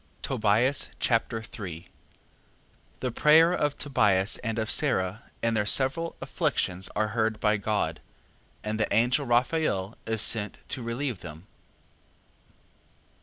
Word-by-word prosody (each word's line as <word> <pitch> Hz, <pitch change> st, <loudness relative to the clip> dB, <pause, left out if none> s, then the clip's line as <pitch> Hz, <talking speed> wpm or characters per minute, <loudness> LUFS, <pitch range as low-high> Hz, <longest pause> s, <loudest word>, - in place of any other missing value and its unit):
Tobias 110 Hz, +6 st, +1 dB
Chapter 115 Hz, -1 st, 0 dB
3 90 Hz, -6 st, -8 dB, 1.2 s
The 125 Hz, -1 st, -1 dB
prayer 160 Hz, +7 st, +5 dB
of 145 Hz, -4 st, 0 dB
Tobias, 105 Hz, -8 st, +1 dB
and 115 Hz, -2 st, -4 dB
of 110 Hz, +1 st, 0 dB
Sara, 100 Hz, -8 st, +1 dB
in 115 Hz, 0 st, +2 dB
their 105 Hz, -2 st, 0 dB
several 135 Hz, +8 st, +1 dB
afflictions, 95 Hz, +1 st, -1 dB
are 110 Hz, 0 st, 0 dB
heard 110 Hz, -1 st, -1 dB
by 105 Hz, 0 st, +2 dB
God, 105 Hz, +1 st, -1 dB, 0.6 s
and 110 Hz, 0 st, -3 dB
the 110 Hz, -, 0 dB
angel 125 Hz, +6 st, +2 dB
Raphael 120 Hz, -5 st, 0 dB
is 110 Hz, -1 st, +1 dB
sent 105 Hz, -3 st, +3 dB
to 130 Hz, -, -2 dB
relieve 120 Hz, -1 st, -3 dB
them. 80 Hz, 0 st, -10 dB
110 Hz, 120 wpm, -27 LUFS, 105-130 Hz, 1.2 s, prayer